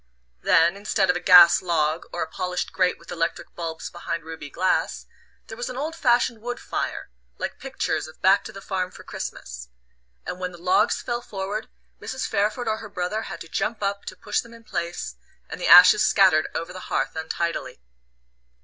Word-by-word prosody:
Then, 170 +3 +4
instead 200 -2 +1
of - - -5
a - - -1
gas 175 -1 +8
log, 160 -2 0
or 175 - -2
a - - -6
polished 180 +2 -3
grate 180 -1 +1
with 170 - -14
electric 165 0 -3
bulbs 165 -2 -5
behind 170 -1 -4
ruby 160 -2 -8
glass, 185 +5 0 0.4
there 225 - -9
was 240 +1 -4
an 255 - -6
old 310 +4 -3
fashioned 240 -6 +2
wood 245 +1 -4
fire, - - -4 0.3
like - - -5
pictures - - -2
of 155 - -15
"Back 195 +1 +4
to - - -7
the 195 - -11
farm 185 -2 -2
for - - -13
Christmas"; 60 -1 -7 0.6
and 180 - -5
when 180 -1 -4
the - - -11
logs 180 +2 +2
fell 240 0 -2
forward 205 +1 -5 0.3
Mrs. 260 - -4
Pairford 220 +4 0
or 220 0 0
her 220 - -9
brother 190 +3 -2
had - - -7
to - - -8
jump 215 +6 -2
up 200 0 -2
to 185 - -7
push 205 +3 -1
them 235 0 -14
in 230 - -16
place, 170 - -4 0.3
and - - -8
the - - 0
ashes 180 +4 +9
scattered 185 -6 +4
over 165 +2 -4
the 185 - -7
hearth - - -1
untidily. 160 - -3
185 Hz, 195 wpm, -24 LUFS, 170-215 Hz, 0.6 s, ashes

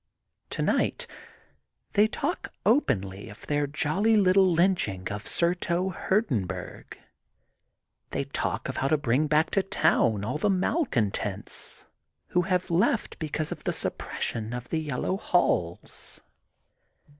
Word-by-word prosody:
Tonight - - 0 0.9
they 210 +1 +5
talk - - -3
openly 100 - +1
of 105 - -12
their 145 -1 0
jolly 160 +10 +2
little 190 -1 +5
lynching 165 - +1
of 105 +1 -5
Surto 175 +1 +1
Hurdenburg. 160 - -2 1.1
They - - -1
talk - - -2
of - - -4
how 135 - +1
to 155 - +3
bring 145 +2 +1
back 155 +2 +2
to 195 - +3
town 110 - +2
all 130 +7 -2
the 205 - +2
malcontents 185 - -1 0.4
who 180 - +3
have 180 0 0
left 190 +6 +1
because 155 -1 -2
of - - -6
the - - 0
suppression 115 0 -3
of 125 0 -6
the 160 - 0
Yellow 155 +5 -2
Halls. 90 - -1
155 Hz, 120 wpm, -27 LUFS, 120-190 Hz, 1.1 s, they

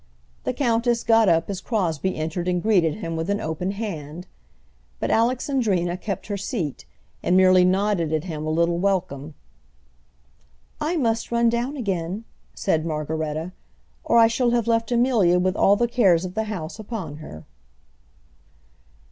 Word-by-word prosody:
The - - 0
countess 235 -2 +1
got 225 -3 +4
up 165 0 +2
as 195 -2 -4
Crosbie 190 - -1
entered 160 +3 -3
and 180 -1 +1
greeted 180 -6 +2
him 165 -6 -5
with 165 +3 -3
an 200 0 0
open 160 +4 -3
hand; 180 -6 -5 0.7
but - - -1
Alexandrina 230 -7 +1
kept 195 0 -5
her 205 -1 -3
seat, 190 - -4 0.4
and 180 - +2
merely 185 -1 +6
nodded 185 -3 +1
at 155 -1 0
him 160 -4 -5
a - - -1
little 170 +2 +1
welcome. 175 -7 -1 1.4
"I 340 +3 -1
must 230 -6 0
run 235 0 +3
down 240 +5 -2
again," 195 -3 -3 0.3
said 160 -5 0
Margaretta, 155 +1 -3 0.5
"or 235 - +2
I 230 - +8
shall 235 +2 +1
have 235 -2 +1
left 230 0 0
Amelia 235 -8 +3
with 185 +1 +1
all 200 - +4
the 240 +3 +1
cares 190 -8 +3
of 180 - -6
the 220 +2 -1
house 185 -3 -6
upon 200 -9 -6
her." 80 - -10
190 Hz, 155 wpm, -23 LUFS, 165-225 Hz, 1.4 s, I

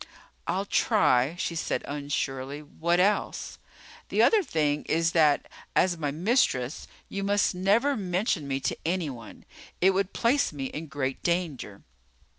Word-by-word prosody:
"I'll 195 +2 -1
try," 160 - +2
she 170 - -2
said 165 - -2
unsurely. 140 0 -3
"What 170 +4 0
else?" 200 +3 0 0.5
"The - - +3
other 440 -2 +5
thing 150 - 0
is 165 +1 +1
that, 155 -4 +3 0.3
as 180 -1 +3
my 150 -3 -2
mistress, 155 - 0 0.2
you 195 - -4
must 200 0 +2
never 205 +10 +2
mention 185 - -1
me 135 0 -2
to - - -1
anyone. 155 -9 -4 0.3
It 190 +2 +5
would 195 0 0
place 250 +5 +2
me 140 -3 -5
in 155 +4 -6
great 135 -3 -3
danger." 165 - -2
165 Hz, 140 wpm, -27 LUFS, 145-195 Hz, 0.5 s, other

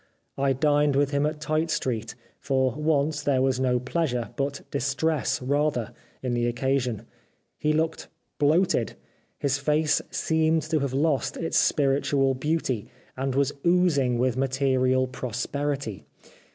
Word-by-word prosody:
I 135 0 +1
dined 145 +1 +2
with 140 0 +2
him 140 +1 +2
at 155 0 -4
Tite 155 +2 0
Street: 120 -7 -2 0.2
for 130 -2 +1
once 150 +1 0
there 135 -3 +2
was 130 -1 +1
no 125 -1 +2
pleasure, 125 -2 -2
but 140 0 -2
distress 140 +2 0
rather, 140 -3 0 0.3
in 125 -2 -1
the 120 0 +1
occasion. 125 -2 -1 0.5
He 155 - +1
looked 160 +1 -1 0.3
bloated. 155 -3 +2 0.4
His 140 0 0
face 150 +1 +2
seemed 160 0 +1
to 155 - +3
have 140 -2 -2
lost 145 -1 0
its 165 - +1
spiritual 135 -1 +2
beauty, 130 -4 -1 0.3
and 135 0 -2
was 140 0 +2
oozing 170 -8 +3
with 125 0 +1
material 130 -1 +2
prosperity. 130 -1 -3
140 Hz, 135 wpm, -26 LUFS, 130-150 Hz, 0.5 s, to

